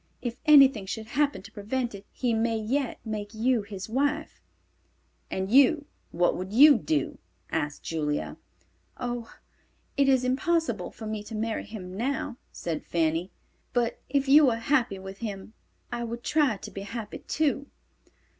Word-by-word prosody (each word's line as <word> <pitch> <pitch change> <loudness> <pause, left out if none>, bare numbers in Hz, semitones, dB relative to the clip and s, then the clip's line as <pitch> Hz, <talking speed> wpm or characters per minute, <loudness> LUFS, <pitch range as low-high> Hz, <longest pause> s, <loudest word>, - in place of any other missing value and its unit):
If 240 -1 -4
anything 275 -9 +7
should 220 +3 -4
happen 285 -5 0
to 215 - -12
prevent 230 +4 -2
it, 200 0 -10
he 245 -3 -1
may 225 0 +1
yet 250 +4 -1
make 215 -1 -5
you 235 +1 +2
his 200 -2 -7
wife." 285 +6 -1 0.9
"And 190 +1 -3
you, 280 +4 +5 0.2
what 175 +1 +2
would 185 +1 -5
you 280 +4 +8
do?" 150 -2 -1 0.3
asked 145 0 -2
Julia. 150 -2 -2 0.6
"Oh, 240 -1 -4 0.7
it 275 -1 +4
is 260 -2 +4
impossible 260 - 0
for 220 - -10
me 215 -1 -3
to 215 +2 -8
marry 220 +1 -2
him 190 -4 -8
now," 245 +2 -2
said 165 -2 -4
Fanny. 165 +2 0 0.4
"But 240 -1 0
if 280 0 +1
you 290 +1 +7
were 235 - +3
happy 230 -3 +1
with 190 +1 -9
him, 210 -2 -6 0.4
I 240 0 -2
would 235 +1 -5
try 290 -9 +2
to - - -9
be 195 - -6
happy, 210 +1 -6
too." 285 -2 0
230 Hz, 155 wpm, -27 LUFS, 200-265 Hz, 0.9 s, you